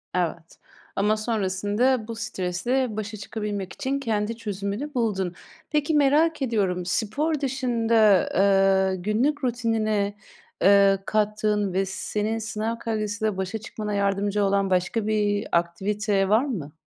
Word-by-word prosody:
Evet. 170 -1 -3 0.4
Ama 210 +2 +2
sonrasında 215 +3 0
bu 230 - -5
stresle 220 +3 -2
başa 215 0 -4
çıkabilmek 205 -2 -5
için 275 -1 -2
kendi 225 -2 -1
çözümünü 210 +6 -4
buldun. 195 -7 -1 0.4
Peki 300 +1 0
merak 300 +2 +3
ediyorum, 195 -8 0
spor 280 - 0
dışında, 230 -7 +2
ııı, 195 0 +3
günlük 260 +9 0
rutinine, 220 -4 0 0.5
ııı, 195 0 +6
kattığın 210 -2 0
ve 195 +1 +1
senin 210 +3 -2
sınav 220 +1 -3
kaygısıyla 215 -2 -2
başa 190 +3 -2
çıkmana 215 -1 -5
yardımcı 200 +1 +1
olan 195 0 +1
başka 185 +4 0
bir 205 -1 0
aktivite 195 +4 0
var 225 +6 +4
mı? 165 - -5
210 Hz, 120 wpm, -25 LUFS, 195-230 Hz, 0.5 s, ııı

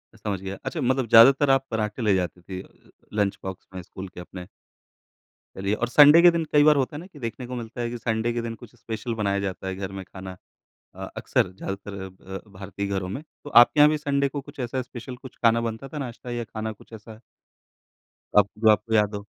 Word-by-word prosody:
समझ 105 -3 -4
गया। 95 0 -6
अच्छा - - -3
मतलब 130 -1 +1
ज़्यादातर 135 +5 +7
आप 135 0 +3
पराठे 110 +1 -2
ले 105 -3 +3
जाती 90 -1 -2
थी 95 +1 -7
अ, - - -15 0.5
लंच 100 -2 0
बॉक्स 95 -1 -7
में 90 - -5
स्कूल 95 +2 -9
के 90 - -12
अपने। 90 0 -9 1.1
चलिए 100 +1 -1
और 120 +2 -1
संडे 150 +5 +8
के 175 0 +8
दिन 165 -1 -1
कई 145 0 +6
बार 150 0 +6
होता 140 +1 -1
है - - -5
ना 175 - -9
कि 165 -7 -15
देखने 120 +1 -5
को 125 - -5
मिलता 120 0 -6
है 120 - -1
कि 120 - -5
संडे 115 0 -1
के 120 - -2
दिन 115 0 -5
कुछ 120 0 -15
स्पेशल 115 0 -5
बनाया 100 -2 0
जाता 95 -1 -4
है 95 - -3
घर 95 0 -5
में - - -6
खाना। 95 0 -9 0.6
अ, - - -7
अक्सर 90 - 0
ज्यादातर 100 +1 -6
अ, 95 - -5
ब 95 +1 -9 0.2
भारतीय 100 +1 -5
घरों 95 -2 -2
में। 135 +10 -5 0.2
तो 145 - -8
आपके 120 +4 +6
यहाँ 150 0 +8
भी 155 - 0
संडे 140 -2 0
को 145 +1 -5
कुछ 145 +1 -14
ऐसा 130 +1 -2
स्पेशल 125 0 -8
कुछ 130 -1 -12
खाना 115 0 +4
बनता 115 +3 -4
था - - -4
नाश्ता 125 -1 -6
या 120 0 -2
खाना 110 0 -5
कुछ 110 - -19
ऐसा? 110 0 -11 1.2
अब 105 -1 +7
जो 110 0 +4
आपको 110 +1 +2
याद 105 -1 +3
हो। 100 0 -7
115 Hz, 230 wpm, -25 LUFS, 100-130 Hz, 1.2 s, संडे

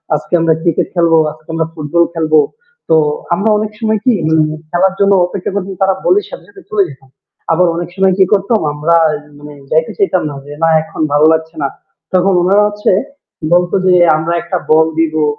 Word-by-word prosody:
আজকে 150 - -7
আমরা 165 -1 +2
ক্রিকেট 170 -2 0
খেলবো, 170 -2 +3
আজকে 155 +1 -18
আমরা 160 0 -1
ফুটবল 165 +2 0
খেলবো।" 155 -2 +2 0.5
তো 160 - +4 0.4
আমরা 200 +5 0
অনেক 215 0 -3
সময় 220 -2 0
কি 255 - +4
উম 160 0 +3 0.3
খেলার 185 +3 +1
জন্য 200 0 +3
অপেক্ষা 180 +1 -5
করছি 195 -1 -3
তারা 190 0 +2
বললে 405 +2 +3
সাথে - - -10
সাথে 400 -1 -15
চলে 210 -2 +2
যেতাম। 135 -1 -15 0.4
আবার 175 +2 +3
অনেক 170 0 -4
সময় 190 -1 +2
কি 190 - +5
করতাম 205 +3 +1
আমরা 155 +3 +1 0.4
মানে 145 0 -11 0.2
যাইতে 160 +1 +1
চাইতাম 400 -2 +1
না - - -7
যে, 145 - -9
"না 165 - +4
এখন 160 - -8
ভালো 145 +1 +4
লাগছে 160 0 -3
না।" 140 - +1 0.5
তখন 185 +1 +2
উনারা 200 +3 +3
হচ্ছে 210 0 -1 0.6
বলত 175 0 +2
যে, 185 - +4 0.2
"আমরা 165 +2 -2
একটা 175 +2 -3
বল 160 +1 +5
দিবো, 155 -1 +1
170 Hz, 190 wpm, -14 LUFS, 160-195 Hz, 0.6 s, কি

